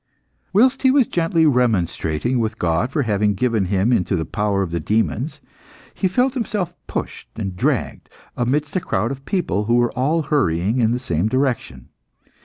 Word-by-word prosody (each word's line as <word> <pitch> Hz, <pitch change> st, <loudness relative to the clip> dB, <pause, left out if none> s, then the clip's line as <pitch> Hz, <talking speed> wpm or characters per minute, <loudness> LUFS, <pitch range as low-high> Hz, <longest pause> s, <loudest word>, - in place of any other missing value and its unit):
Whilst 255 Hz, +7 st, +3 dB
he 265 Hz, -, +4 dB
was 265 Hz, -1 st, +4 dB
gently 165 Hz, -3 st, +1 dB
remonstrating 120 Hz, -, +1 dB
with 110 Hz, -1 st, -2 dB
God 85 Hz, +8 st, 0 dB
for 145 Hz, 0 st, 0 dB
having 105 Hz, -2 st, +1 dB
given 115 Hz, -2 st, +1 dB
him 100 Hz, +6 st, +1 dB
into 95 Hz, -3 st, +1 dB
the 80 Hz, -2 st, -2 dB
power 105 Hz, -2 st, 0 dB
of 90 Hz, -, -5 dB
the 85 Hz, -, -1 dB
demons, 110 Hz, -, -1 dB, 0.5 s
he 190 Hz, -, 0 dB
felt 250 Hz, +7 st, +1 dB
himself 210 Hz, -8 st, -2 dB
pushed -, -, -5 dB
and 100 Hz, -5 st, -4 dB
dragged -, -, -1 dB, 0.3 s
amidst 145 Hz, +6 st, -1 dB
a -, -, +3 dB
crowd 115 Hz, -, -1 dB
of 135 Hz, 0 st, -7 dB
people 160 Hz, -, -1 dB
who 120 Hz, +2 st, +2 dB
were 120 Hz, -1 st, +2 dB
all 150 Hz, +6 st, 0 dB
hurrying 115 Hz, -, +1 dB
in 115 Hz, -2 st, +3 dB
the 120 Hz, -, +1 dB
same 90 Hz, -7 st, -1 dB
direction. 125 Hz, -, -2 dB
120 Hz, 175 wpm, -21 LUFS, 100-150 Hz, 0.5 s, he